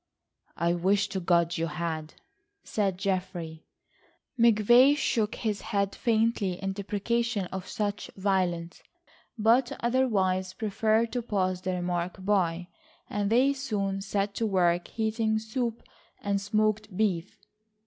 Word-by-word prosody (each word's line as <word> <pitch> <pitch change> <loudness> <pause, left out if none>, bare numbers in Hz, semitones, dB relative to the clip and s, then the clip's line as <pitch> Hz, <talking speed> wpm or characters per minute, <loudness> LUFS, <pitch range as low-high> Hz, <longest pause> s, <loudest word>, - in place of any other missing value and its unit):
"I 170 +1 +1
wish 195 +4 +1
to 195 - -2
God 170 -1 +2
you 165 - 0
had," 160 -1 -4 0.5
said 195 -4 -1
Geoffrey. 180 -4 -3 0.7
McVay 240 +5 +6
shook 225 -6 0
his 215 -3 -2
head 200 -2 -1
faintly 225 -4 +1
in 195 +2 -4
deprecation 210 +2 -1
of 190 0 -5
such 205 -1 -3
violence, 180 -3 -1 0.6
but 235 +3 +3
otherwise 195 -7 +1
preferred 220 +2 +1
to 245 - -1
pass 185 -5 -1
the 185 0 -2
remark 180 +1 -3
by, 180 -4 +1 0.4
and 205 -1 0
they 255 +5 +4
soon 205 -8 -2
set 200 0 -1
to 225 +2 -1
work 175 -3 +2
heating 220 0 0
soup 225 +1 -3 0.4
and 200 -1 -1
smoked 215 -1 0
beef. 195 -5 0
200 Hz, 125 wpm, -28 LUFS, 185-220 Hz, 0.7 s, McVay